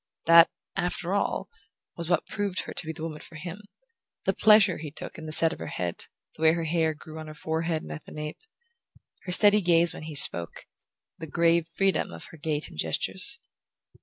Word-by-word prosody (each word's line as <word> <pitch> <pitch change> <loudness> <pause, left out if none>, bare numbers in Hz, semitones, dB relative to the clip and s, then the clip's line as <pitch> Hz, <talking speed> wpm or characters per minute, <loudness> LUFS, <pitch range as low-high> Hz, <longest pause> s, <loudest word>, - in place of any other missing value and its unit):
That, 165 0 +8 0.3
after 180 0 -2
all, 200 -1 -1 0.5
was 170 -1 -6
what 175 -3 +2
proved 200 -3 -2
her - - -8
to - - -4
be - - -2
the 160 0 -9
woman 155 -2 -5
for 160 - -12
him: 175 +5 -7 0.6
the - - +2
pleasure 210 -5 +5
he 155 -1 -6
took 145 - -9
in 160 - -8
the - - -5
set 160 +1 +4
of - - -11
her - - -6
head, 90 -1 -3 0.3
the - - -13
way 160 0 +5
her 170 0 -2
hair 160 -1 0
grew 155 +2 -11
on 155 - -8
her 155 - -9
forehead 160 +1 -2
and 75 - -9
at 75 - -8
the - - -13
nape, 150 0 -6 0.9
her 180 - -4
steady 205 +3 +5
gaze 170 -2 +4
when - - -9
he 155 - -7
spoke, 85 - +3 0.5
the 160 - -7
grave 170 +1 +2
freedom 195 +3 0
of 85 0 -10
her 165 - -12
gait 150 0 -1
and 75 - -12
gestures. 185 - +1
165 Hz, 210 wpm, -27 LUFS, 155-175 Hz, 0.9 s, That